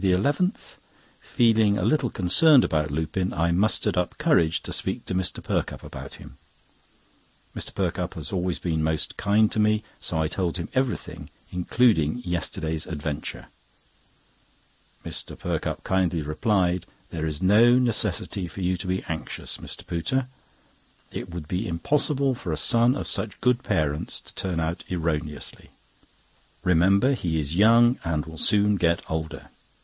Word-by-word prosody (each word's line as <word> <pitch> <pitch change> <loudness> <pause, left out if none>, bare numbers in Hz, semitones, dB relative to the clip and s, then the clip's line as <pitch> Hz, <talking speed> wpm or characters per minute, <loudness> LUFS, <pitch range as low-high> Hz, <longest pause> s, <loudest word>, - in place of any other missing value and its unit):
—Feeling 110 - 0
a 90 - -1
little 125 +1 +2
concerned 125 - +5
about 75 -1 0
Lupin, 80 +5 -2
I 85 0 +1
mustered 100 +5 +1
up 90 -1 -1
courage 140 - +2
to - - -3
speak - - -2
to - - -4
Mr. 90 0 -1
Perkupp - - -2
about - - -9
him. - - -14 1.2
Mr. - - -2
Perkupp - - -2
has - - -6
always 90 -2 0
been 80 -3 -1
most 80 0 -1
kind 105 +1 +2
to - - -1
me, 105 0 +2 0.2
so 80 - -2
I 80 - +1
told 90 +1 -2
him 85 - -5
everything, 130 -1 -2 0.2
including 90 +1 +2
yesterday's 85 -2 -2
adventure. 75 -2 -5 1.6
Mr. - - -4
Perkupp - - -3
kindly 90 -4 0
replied: 90 +3 0 0.2
"There 80 -1 -2
is 75 +2 -3
no 115 +6 +6
necessity 105 -6 0
for 95 - -8
you 90 0 0
to 95 - -6
be 95 +1 -1
anxious, 80 -1 -5
Mr. - - -9
Pooter. 90 +11 -1 0.9
It - - -6
would 85 -3 -7
be 95 +6 -2
impossible 140 - +1
for 95 -8 -5
a 80 - -1
son 120 - +4
of - - -4
such 105 -3 -2
good 125 0 +2
parents 75 - -1
to - - -15
turn 90 -3 -2
out 80 +1 -2
erroneously. 80 -4 -3 0.9
Remember 95 +9 +4
he 85 -10 -1
is 75 +2 -2
young, 115 +5 +5
and 80 -2 -1
will 80 -1 -9
soon 105 0 +3
get 85 -1 +1
older. 80 0 -5
90 Hz, 145 wpm, -25 LUFS, 80-110 Hz, 1.6 s, no